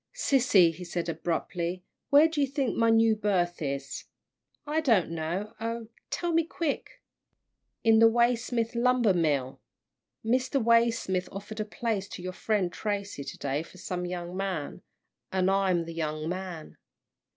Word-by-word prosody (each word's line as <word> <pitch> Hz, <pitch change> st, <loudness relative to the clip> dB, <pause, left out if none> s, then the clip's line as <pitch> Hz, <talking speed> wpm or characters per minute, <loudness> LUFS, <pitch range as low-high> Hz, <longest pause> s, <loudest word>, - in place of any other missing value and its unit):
"Sissy," 235 Hz, -, +4 dB
he 180 Hz, +3 st, -9 dB
said, 175 Hz, -1 st, -3 dB
abruptly, 170 Hz, +2 st, -2 dB, 0.3 s
"where 290 Hz, +3 st, +7 dB
do 315 Hz, -2 st, -2 dB
you 280 Hz, -, +3 dB
think 270 Hz, -2 st, -1 dB
my 230 Hz, 0 st, +3 dB
new 225 Hz, 0 st, +5 dB
berth 185 Hz, -5 st, 0 dB
is?" 140 Hz, -1 st, -4 dB, 0.6 s
"I 305 Hz, +1 st, 0 dB
don't 225 Hz, -, +3 dB
know 170 Hz, +6 st, -3 dB
oh, 230 Hz, 0 st, -4 dB, 0.2 s
tell 345 Hz, -1 st, -1 dB
me 330 Hz, 0 st, +4 dB
quick." 320 Hz, -2 st, -4 dB, 0.8 s
"In 225 Hz, -1 st, +5 dB
the 225 Hz, 0 st, +8 dB
Waysmith 235 Hz, 0 st, +1 dB
lumber 240 Hz, -3 st, +3 dB
mill. 145 Hz, -7 st, 0 dB, 0.6 s
Mr. 255 Hz, +4 st, +1 dB
Waysmith 230 Hz, -6 st, +2 dB
offered 205 Hz, +2 st, -7 dB
a 215 Hz, -, -1 dB
place 210 Hz, -2 st, -3 dB
to 180 Hz, -, -8 dB
your 185 Hz, 0 st, -4 dB
friend 195 Hz, -3 st, 0 dB
Tracy 200 Hz, -7 st, -3 dB
to -, -, -8 dB
day 140 Hz, +1 st, -1 dB
for 170 Hz, -, -13 dB
some 180 Hz, 0 st, -4 dB
young 175 Hz, 0 st, -5 dB
man, 190 Hz, -6 st, -3 dB, 0.5 s
and 190 Hz, 0 st, +2 dB
I'm 190 Hz, -3 st, +2 dB
the 165 Hz, -, -7 dB
young 155 Hz, -1 st, -3 dB
man." 180 Hz, -2 st, -6 dB
195 Hz, 150 wpm, -28 LUFS, 175-230 Hz, 0.8 s, the